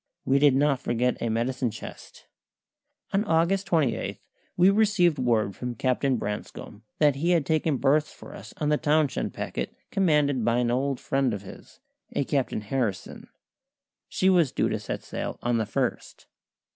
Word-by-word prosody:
We 135 +1 +3
did 140 -2 +5
not 140 -1 +2
forget 125 +1 -1
a 115 - -1
medicine 120 +3 -1
chest. - - -11 0.9
On 195 +2 +2
August 180 +1 +1
28 155 -10 0 0.4
we 185 +2 +6
received 195 -7 +3
word 110 -6 +1
from 125 +2 -5
Captain 130 +2 +1
Branscome 105 0 -6 0.2
that 145 -3 +3
he 165 +5 0
had 170 -5 +3
taken 155 -2 +1
berths 145 +4 +2
for - - -12
us - - -10
on 150 - -1
the 150 - +3
Townshend 150 -2 0
packet, - - -4 0.2
commanded 150 - +2
by 115 +1 +2
an 120 -1 +1
old 135 +1 0
friend 135 -4 0
of 100 - -8
his, 95 - -13 0.3
a - - 0
Captain 135 -5 -1
Harrison. 110 -3 -3 0.8
She 185 - 0
was 175 -7 +4
due - - 0
to - - -2
sail - - -5
on 120 -1 +1
the 110 - 0
1st. 105 - -3
135 Hz, 160 wpm, -26 LUFS, 120-155 Hz, 0.9 s, we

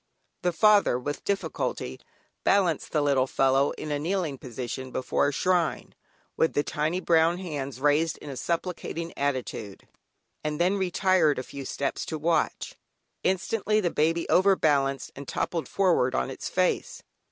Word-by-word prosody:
The 180 - +1
father 205 - +4
with 145 +4 -4
difficulty 200 -1 -2 0.4
balanced 180 -6 +2
the 150 -2 +1
little 135 -2 +2
fellow 135 +1 +3
in 150 - -6
a 145 - 0
kneeling 165 -4 -2
position 130 +1 -6
before 130 +2 0
a - - +1
shrine, 175 +1 0 0.4
with 160 - +2
the 145 - +1
tiny 155 +5 -1
brown 170 -1 +3
hands 145 -8 -5
raised 150 +3 +2
in - - -12
a - - -6
supplicating 170 +2 -3
attitude, 130 -7 -3 0.6
and 150 -1 -2
then 180 +3 +3
retired 185 -4 +2
a 130 - -2
few 140 +1 -8
steps 140 +1 -2
to 160 - -3
watch. 165 +2 0 0.5
Instantly 210 +3 +1
the 175 -5 0
baby 165 +2 +1
overbalanced 150 -8 +2
and 140 0 -9
toppled 165 -2 -2
forward 175 -10 +2
on 65 - -1
its - - -6
face. - - 0
155 Hz, 150 wpm, -27 LUFS, 140-180 Hz, 0.6 s, father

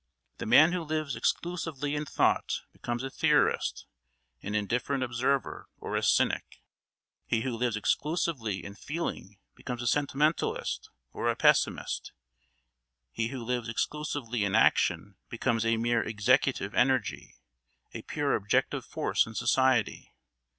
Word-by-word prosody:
The - - -4
man 155 +9 +7
who 180 -1 -1
lives 155 -2 -2
exclusively 165 -5 -2
in 150 0 -2
thought - - +1
becomes 120 +1 -4
a 135 - -4
theorist, 150 +1 +1 0.6
an 105 +1 -4
indifferent 120 +6 0
observer, 130 +3 -1
or - - -5
a - - +1
cynic; - - +1 0.6
he 115 - +1
who 125 -1 -2
lives 120 -1 0
exclusively 140 - -1
in 100 - -7
feeling 105 - -5 0.2
becomes 125 -1 -6
a - - -5
sentimentalist 145 +4 0 0.2
or - - -1
a - - +1
pessimist; - - +1 1.0
he 115 - -1
who 125 0 -6
lives 120 -1 -2
exclusively 125 -3 -2
in 100 - 0
action 100 -2 +2
becomes 115 -1 0
a 115 0 +2
mere 120 0 +1
executive 110 0 +1
energy, 125 -3 0 0.6
a - - -6
pure 145 -2 -1
objective 105 +1 0
force - - 0
in 110 - -10
society. 130 -4 +1
125 Hz, 130 wpm, -29 LUFS, 115-145 Hz, 1.0 s, man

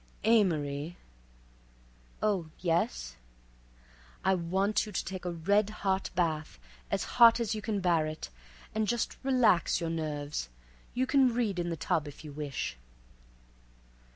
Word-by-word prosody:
"Amory." 170 -8 +2 1.3
"Oh, 200 -6 +1
yes." 65 - -1 1.1
"I 190 - +5
want 190 +5 +1
you - - -7
to - - -2
take 185 -1 -6
a 175 - -1
red 200 +5 +2
hot 195 -2 -1
bath 160 -4 -1 0.3
as - - 0
hot 235 -1 +6
as 230 -3 0
you 215 - -4
can 210 -1 -2
bear 170 -4 +2
it, 155 - -6 0.4
and 220 0 0
just 240 0 -1
relax 250 -12 +3
your 165 -2 -2
nerves. 150 - -3 0.5
You 255 +1 +2
can 265 -2 +4
read 215 -7 0
in 175 0 -1
the 165 - -3
tub 150 0 0
if 145 +2 -10
you 150 - -7
wish." 140 - -4
180 Hz, 140 wpm, -30 LUFS, 155-215 Hz, 1.3 s, hot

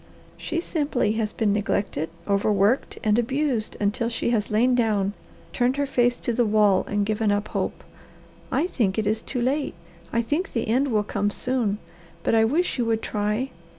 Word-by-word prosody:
"She 335 - -3
simply 295 - 0
has 220 -1 -1
been 210 -3 +1
neglected, 200 -6 -1 0.2
overworked, 200 +4 +2
and 215 +1 +3
abused 260 -2 -1
until 210 +3 0
she 235 0 -1
has 215 -3 0
lain 235 +4 +3
down, 210 -5 +1 0.4
turned 250 +2 +1
her 285 - +1
face 245 -2 +2
to 240 - -2
the 240 - +2
wall, 210 -3 +4
and 205 0 0
given 215 0 +1
up 205 +1 -1
hope. - - -3 0.7
I 315 - +2
think 220 - 0
it 215 - 0
is 215 +2 0
too 245 0 -3
late. 275 - 0 0.4
I 235 0 +1
think 300 +11 -2
the 230 - -1
end 255 +6 +2
will 215 -5 +1
come 205 0 -1
soon. 230 -2 0 0.5
But - - +1
I 225 0 +5
wish 310 +4 0
you 240 - +2
would 225 -1 0
try. 210 +5 -1
225 Hz, 185 wpm, -24 LUFS, 210-250 Hz, 0.7 s, I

